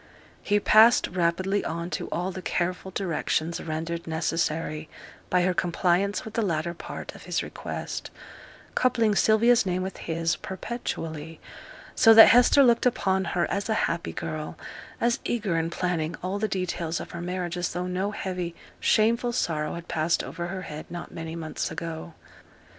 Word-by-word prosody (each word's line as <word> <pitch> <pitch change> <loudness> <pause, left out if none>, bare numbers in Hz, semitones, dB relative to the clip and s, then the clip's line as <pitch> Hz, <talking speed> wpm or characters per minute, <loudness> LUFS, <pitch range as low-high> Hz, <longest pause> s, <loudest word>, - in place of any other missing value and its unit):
He 205 0 +2
passed 220 +3 +6
rapidly 185 +3 0
on 170 +2 -4
to - - -3
all 180 +2 -2
the 185 - -7
careful 180 +1 -2
directions 170 -3 -1
rendered 165 +1 -4
necessary 160 -1 -1 0.4
by 180 -1 +3
her 185 0 +2
compliance 180 +2 +1
with 220 - -8
the 230 - 0
latter 170 -4 -1
part 170 - -8
of - - -13
his - - -1
request, - - -6 0.6
coupling 230 -4 +2
Sylvia's 225 +3 +4
name 185 -1 -1
with 190 - -5
his 165 +1 -1
perpetually; 165 -7 -5 0.5
so 225 -1 +7
that 225 - +11
Hester 245 +4 +6
looked 240 -1 +4
upon 190 -5 +1
her 175 0 0
as 200 +2 -2
a 220 - +2
happy 170 0 -3
girl, 155 -1 -5 0.4
as 235 0 +1
eager 210 -7 -1
in 165 0 0
planning 170 -2 -1
all 190 +2 -2
the 215 - +1
details 180 -4 -2
of - - -8
her 170 - -6
marriage 180 0 -3
as 175 0 -2
though 180 0 -2
no 185 +2 -1
heavy 180 -4 -4 0.2
shameful 235 +2 +3
sorrow 155 -9 -1
had 170 0 -8
passed 165 0 +1
over 170 0 -5
her 185 +1 -5
head 150 -1 -7
not 175 0 -7
many 165 0 -6
months 160 -2 -3
ago. 165 0 -6
180 Hz, 165 wpm, -26 LUFS, 165-200 Hz, 0.6 s, that